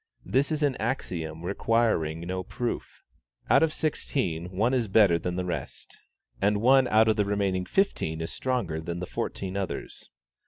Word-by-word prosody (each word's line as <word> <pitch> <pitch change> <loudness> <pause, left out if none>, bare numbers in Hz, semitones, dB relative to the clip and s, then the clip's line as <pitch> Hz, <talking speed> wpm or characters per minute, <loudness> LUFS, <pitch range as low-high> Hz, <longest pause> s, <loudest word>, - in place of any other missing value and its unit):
This 140 +3 +1
is 155 -1 0
an 140 -3 +2
axiom 85 - -3
requiring 100 -6 +1
no 90 +2 -3
proof. 120 +6 -5 0.5
Out - - +6
of 160 -1 +3
sixteen, 95 - -2
one 105 +7 +1
is 120 -4 +1
better 95 -4 +5
than 90 +2 -3
the 90 0 -2
rest, 90 - -6 0.4
and 100 +1 +2
one 130 +3 +5
out 110 0 +4
of 110 0 +3
the 105 - +2
remaining 100 -2 0
fifteen 80 - 0
is 80 - -3
stronger 115 -12 -2
than 85 +1 -4
the 90 - -4
fourteen 95 +1 -4
others. 100 -2 -5
100 Hz, 165 wpm, -27 LUFS, 85-120 Hz, 0.5 s, Out